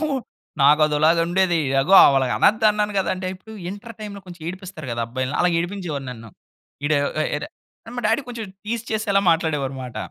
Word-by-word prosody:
నాకు, 310 - 0 0.6
నాకు 150 +2 +6
అధోలాగా 155 +3 +3
ఉండేది. 175 -1 +2 0.2
అగో 185 +8 +3 0.2
అలాగనొద్దు 200 - +3
అన్నాను 210 0 -1
కదా! 190 - 0
అంటే 185 0 -5
ఇప్పుడు 205 +4 -14 0.2
ఇంటర్ 210 +3 -9
టైమ్‌లో 205 -2 -7
కొంచెం 175 -2 -11
ఏడిపిస్తారు 185 -5 -8
కదా! 115 - -2
అబ్బాయిల్ని. 130 +3 -3
అలా 180 - +4
ఏడిపించేవారు 175 -6 -4
నన్ను. 115 -2 -10 0.5
ఈడూ 150 0 +2 0.4
ఎ - - -2
డా - - -9 0.5
మా 245 - -3
డాడీ 225 +6 +2
కొంచెం 235 -3 -5 0.2
టీజ్ 230 +1 -3
చేసేలా 215 -2 +1
మాట్లాడేవారు 150 -5 0
అన్నమాట. 130 -2 -8
180 Hz, 170 wpm, -22 LUFS, 145-205 Hz, 0.6 s, నాకు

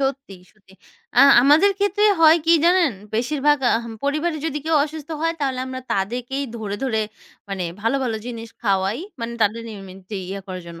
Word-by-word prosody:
সত্যি, 270 -6 -3 0.2
সত্যি। 195 -3 -24 0.5
আ - - +9 0.2
আমাদের 310 +9 +5
ক্ষেত্রে 405 +1 +1 0.2
হয় 320 +1 +7
কি 335 - +6
জানেন, 345 -5 +4 0.2
বেশিরভাগ 290 +5 +1 0.2
আহ 230 - -4 0.2
পরিবারে 305 +3 0
যদি 300 -1 -2
কেউ 320 0 +1
অসুস্থ 310 0 -9
হয় 330 0 +1
তাহলে 265 -3 -1
আমরা 260 0 -6
তাদেরকেই 245 +8 -2
ধরে, 205 -3 -4
ধরে 225 -5 0 0.5
মানে 195 -2 -3 0.2
ভালো 230 +6 +1
ভালো 230 -3 -1
জিনিস 230 -2 -6
খাওয়াই, 195 +2 +1 0.2
মানে 235 0 -4
তাদের 215 +2 +1
ইমিউনিটি 195 +1 -9
ইয়ে 195 +1 -5
করার 185 -1 -6
জন্য। 170 -1 -10
250 Hz, 170 wpm, -21 LUFS, 205-300 Hz, 0.5 s, আ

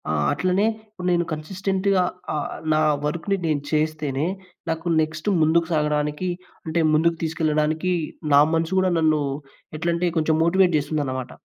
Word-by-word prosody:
ఆ! - - +1 0.2
అట్లనే 185 +3 +1 0.2
ఇప్పుడు 185 -4 -6
నేను 175 -1 +2
కన్సిస్టెంట్‌గా 190 +4 0 0.3
ఆహ్, 150 - -3 0.2
నా 155 - +3 0.2
వర్క్‌ని 170 +6 -1
నేను 150 -2 0
చేస్తేనే 155 -2 0 0.4
నాకు 165 +1 -2
నెక్స్ట్ 155 +2 -4
ముందుకు 165 +2 +3
సాగడానికి 150 +2 0 0.4
అంటే 160 +1 -1
ముందుకు 165 +2 +3
తీసుకెళ్లడానికి, 155 +2 0 0.4
నా 140 - +8
మనసు 165 +3 0
కూడా 185 -1 +2
నన్ను 155 -2 +3 0.6
ఎట్లాంటే 170 +2 0
కొంచెం 160 0 +2
మోటివేట్ 180 0 +3
చేస్తుందన్నమాట. 140 -4 -2
160 Hz, 130 wpm, -23 LUFS, 155-180 Hz, 0.6 s, నా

